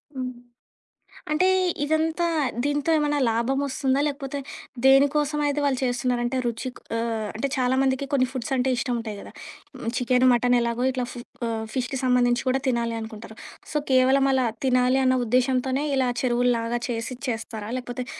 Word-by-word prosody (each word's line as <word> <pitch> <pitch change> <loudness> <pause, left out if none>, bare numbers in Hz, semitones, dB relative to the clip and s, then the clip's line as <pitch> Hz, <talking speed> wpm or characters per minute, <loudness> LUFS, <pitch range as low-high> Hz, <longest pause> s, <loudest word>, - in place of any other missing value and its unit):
హ్మ్. 255 -1 -3 1.0
అంటే, 365 +5 +3 0.4
ఇదంతా, 320 +3 +1 0.4
దీంతో 290 +2 0
ఏమన్నా 295 -1 +1
లాభమోస్తుందా? 270 +3 0
లేకపోతే, 280 -1 -4 0.5
దేనికోసమయితే 290 +2 +3
వాళ్ళు 265 -3 +1
చేస్తున్నారు? 245 0 0
అంటే, 260 +2 -1
రుచి 235 +2 -2 0.3
ఆహ్, 225 -2 -2
అంటే, 275 +5 -1
చాలామందికి 260 +1 +1
కొన్ని 255 -2 +3
ఫుడ్సంటే 260 0 -1
ఇష్టం 250 -2 -1
ఉంటాయి 215 -3 -6
కదా! - - -11 0.7
చికెన్, 250 +1 +2
మటన్ 245 +1 +3
ఎలాగో 235 +2 -1
ఇట్లా 250 -1 -2
ఫు 245 - -8 0.3
ఆహ్, 220 -1 -3
ఫిష్‌కి 255 +1 -2
సంబంధించి 245 -1 +2
కూడా 265 +1 +1
తినాలి 235 -2 0
అనుకుంటారు. 220 0 -9 0.4
సో, - - +1
కేవలం 265 +1 +4
అలా 260 -2 +2 0.2
తినాలి 255 +1 +3
అన్న 255 0 +3
ఉద్దేశ్యంతోనే, 255 +3 +1
ఇలా 260 -2 +2
చెరువులులాగా 240 -1 +1
చేసి 235 +2 -3
చేస్తారా? 225 -2 -5
లేకపోతే, 245 0 -6
255 Hz, 140 wpm, -24 LUFS, 240-270 Hz, 1.0 s, కేవలం